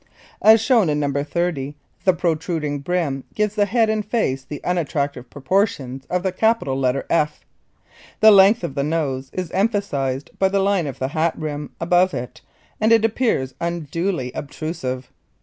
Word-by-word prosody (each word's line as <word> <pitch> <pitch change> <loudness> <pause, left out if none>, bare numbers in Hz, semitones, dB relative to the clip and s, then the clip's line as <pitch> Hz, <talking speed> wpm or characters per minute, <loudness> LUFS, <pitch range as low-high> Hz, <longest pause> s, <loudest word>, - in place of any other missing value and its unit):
As 220 +1 +7
shown 225 - +3
in 150 0 0
No. 140 -1 -1
30 150 -3 -2 0.3
the 185 - +5
protruding 160 -3 -1
brim 145 -3 -1
gives 210 -1 0
the 205 -1 +1
head 230 +1 +2
and 215 -1 0
face 200 - -1
the 145 +2 -7
unattractive 145 -7 -2
proportions 135 - -1
of 180 0 -1
the 190 - 0
capital 220 -8 +1
letter 135 0 0
"F." 150 -2 0 0.7
The 220 0 +8
length 195 0 +6
of 170 - -3
the 140 0 -1
nose 140 -4 -2
is 180 -3 -4
emphasized 180 - -1
by 190 - +3
the 200 - 0
line 195 -4 +1
of 135 - -6
the 130 - -2
hat 160 +2 0
rim 150 -1 -5
above 180 +2 +2
it 120 0 -6 0.4
and 220 +1 +2
it 225 -1 +5
appears 220 - 0
unduly 170 -3 -2
obtrusive. 135 -4 -5
165 Hz, 165 wpm, -21 LUFS, 140-195 Hz, 0.7 s, The